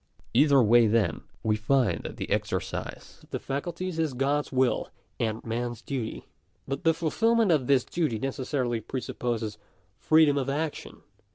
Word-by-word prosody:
Either 140 +1 +5
way 115 +1 +6
then, 110 0 +1 0.2
we 110 -1 +2
find 110 -5 +1
that - - -7
the - - -5
exercise - - -3
of - - -22
ithe 140 +1 -3
facul 175 - -5
ties 185 -3 -4
is 155 -5 0
God's 140 +3 0
will 130 -2 +1 0.3
and 110 -1 -2
man's 120 0 -3
duty. 125 -6 -4 0.2
» - - -43
But 135 +5 -3
the 165 -2 +4
fulfilment 225 +6 +2
of 140 -6 +2
this 135 -3 +3
duty 155 -10 -1
necessarily 130 -1 -2
presupposes 115 -3 -3 0.4
free 160 0 +5
'dom 145 -1 +2
of 135 0 -2
action. 150 +2 -4
135 Hz, 165 wpm, -27 LUFS, 115-150 Hz, 0.4 s, way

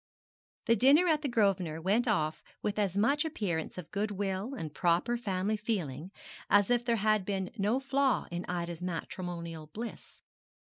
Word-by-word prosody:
The 230 - +4
dinner 275 - +6
at 310 -3 +3
the 295 - -1
Grosvenor 195 - +1
went 205 +8 +2
off 155 -8 0 0.2
with 210 0 -1
as 200 -2 0
much 280 +8 +3
appearance 195 - -3
of 180 -4 -8
goodwill 205 +3 -2
and 160 - -6
proper 175 +9 +2
family 205 -2 -1
feeling 185 - -3 0.4
as 205 +2 +4
if 240 -1 +3
there 235 -1 +2
had 215 -1 +2
been 190 -1 -2
no 215 +4 +1
flaw 270 -2 +1
in 175 +1 -3
Ida's 170 -1 -4
matrimonial 170 -2 -5
bliss. 225 +9 -8
200 Hz, 155 wpm, -31 LUFS, 175-235 Hz, 0.4 s, dinner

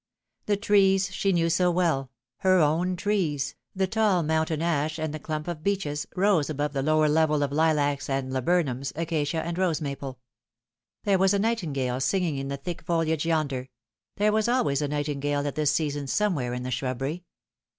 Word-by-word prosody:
The 205 -1 +2
trees 195 -2 +3
she 195 0 +1
knew 170 -2 +2
so 180 +2 +2
well 165 -7 +1 0.3
her 185 -1 +3
own 170 +3 +2
trees 175 -8 -1 0.2
the 190 0 +2
tall 200 -3 +2
mountain 160 0 0
ash 155 -2 0
and 155 -1 -3
the 155 - -5
clump 155 +1 -4
of 170 -3 -4
beeches, 175 -6 -1
rose 185 -6 +2
above 145 -1 -2
the 135 - -1
lower 155 +2 +3
level 150 -1 +2
ol 140 - 0
lilacs 145 -3 +1
and 135 -1 -1
laburnums, 135 -1 0
acacia 160 -1 -1
and 170 +1 -3
rose 175 -4 +1
maple. 140 -3 -5 0.9
There 200 -3 +2
was 195 +1 +4
a - - +3
nightingale 150 - -1
singing 170 +1 0
in 135 0 -4
the 140 0 -3
thick 170 +4 -6
foliage 165 -2 0
yonder 140 -6 -1 0.5
there 210 +1 +3
was 220 +1 +2
always 235 - +1
a 145 - 0
nightingale 145 0 -1
at 145 - -2
this 150 -2 +1
season 145 -3 -1
somewhere 140 -9 0
in 125 - -4
the 125 - -4
shrubbery. 135 +6 -3
155 Hz, 180 wpm, -26 LUFS, 145-180 Hz, 0.9 s, was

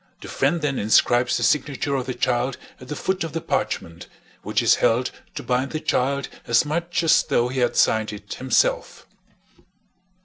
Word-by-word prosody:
The - - -9
friend 150 +4 0
then 140 -3 -1
inscribes 120 +3 +3
the - - -3
signature 145 -1 0
of 130 -2 -2
the 130 - -3
child 120 +1 0 0.2
at 125 - -12
the 150 - -5
foot 190 +4 -2
of 165 - -6
the 165 - -2
parchment, 85 - -3 0.3
which - - -1
is - - +4
held 125 +3 +2 0.2
to - - -5
bind 130 +3 -1
the 155 - -2
child 140 0 0 0.2
as 115 +5 +3
much 170 +3 -2
as 165 - +5
though 120 +1 0
he 130 +1 -3
had 120 -1 +1
signed 110 -1 +2
it 105 0 -8
himself. - - 0
130 Hz, 180 wpm, -23 LUFS, 120-155 Hz, 0.3 s, as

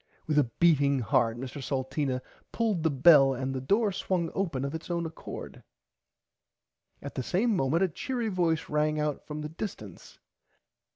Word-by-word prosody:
With 150 -1 +2
a 145 - +4
beating 145 -5 +4
heart 115 0 +1
Mr 130 +3 -6
Salteena 130 0 -2 0.3
pulled 220 -7 0
the 160 - +2
bell 135 -1 +6
and 130 +1 -3
the 130 - -3
door 205 - +2
swung 180 -3 -1
open 160 -9 -1
of 140 - -4
its 160 +2 -6
own 170 -1 -1
accord. 160 0 -8 1.4
At - - -6
the - - -3
same 210 - +1
moment 160 +3 +2
a - - +3
cheery 235 - -3
voice 170 -5 0
rang 150 0 0
out 150 -1 -2
from 150 0 -5
the 150 - -5
distance. 150 - -8
150 Hz, 165 wpm, -28 LUFS, 135-175 Hz, 1.4 s, bell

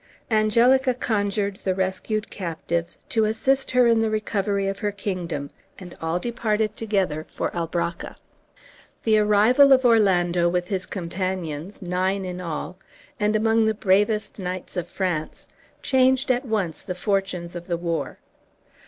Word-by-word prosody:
Angelica 240 +4 +4
conjured 205 -4 -1
the 190 -2 -2
rescued 190 +3 -2
captives 170 -2 -3
to 225 - +1
assist 265 +5 +1
her 250 -1 +4
in 230 -1 +4
the 225 0 +1
recovery 205 -2 -1
of 195 0 -2
her 205 - -1
kingdom, 175 -8 -4 0.3
and 180 -2 -10
all 165 +1 0
departed 215 -1 -1
together 190 -8 -1
for - - -3
Albracca. 170 0 -3 0.9
The 215 -1 +4
arrival 215 +7 +5
of 260 -1 +6
Orlando, 180 -7 +3
with 180 0 -1
his 185 -2 -2
companions, 185 -1 -4
nine 185 +2 -1
in 180 0 -5
all, 175 +2 -5 0.4
and 210 0 +1
among 225 +1 +3
the 220 0 +1
bravest 210 +2 +1
knights 185 -1 -5
of 175 -2 -2
France, 175 -5 -3 0.4
changed 260 0 +3
at 250 +2 0
once 205 -8 -2
the 180 - -5
fortunes 185 -3 -2
of 175 +1 -7
the 170 -2 -1
war. 170 -1 -3
195 Hz, 145 wpm, -24 LUFS, 180-220 Hz, 0.9 s, of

